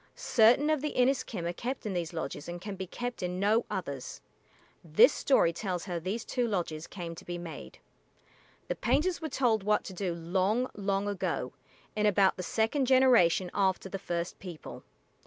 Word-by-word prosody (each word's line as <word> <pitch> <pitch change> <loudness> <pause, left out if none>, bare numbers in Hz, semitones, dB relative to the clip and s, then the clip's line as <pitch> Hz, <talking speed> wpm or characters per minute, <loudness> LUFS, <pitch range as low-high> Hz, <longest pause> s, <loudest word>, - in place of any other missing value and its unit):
Certain 250 +6 +4
of 305 -3 +1
the 300 - -2
Inis´kim 245 -8 +1
are 175 - -2
kept 250 +8 -5
in 205 - -2
these 170 -3 -2
lodges 160 -1 -5
and 175 0 -5
can 200 +2 -6
be 190 -1 -6
kept 245 +6 -5
in 180 0 -3
no 215 +4 +2
others. 140 -8 -5 0.6
This 215 - +6
story 170 -11 +3
tells 180 -1 -3
how 175 -3 -3
these 195 +7 -4
two 245 -2 -1
lodges 170 -6 -3
came 170 -3 -6
to 165 - -11
be 175 0 -5
made. 160 - -8 0.9
The - - 0
painters 300 +11 0
were 315 - -3
told 240 -6 +2
what 210 +2 +1
to 190 - -8
do 180 -2 -2
long, 190 +9 0
long 200 0 -1
ago, 200 -2 -2 0.4
"in 210 0 +2
about 195 -1 +4
the - - -5
second 225 - 0
generation 240 -9 +4
after 190 -1 0
the 195 - -4
first 175 -2 -4
people." 175 -5 -9
195 Hz, 180 wpm, -30 LUFS, 175-235 Hz, 0.9 s, This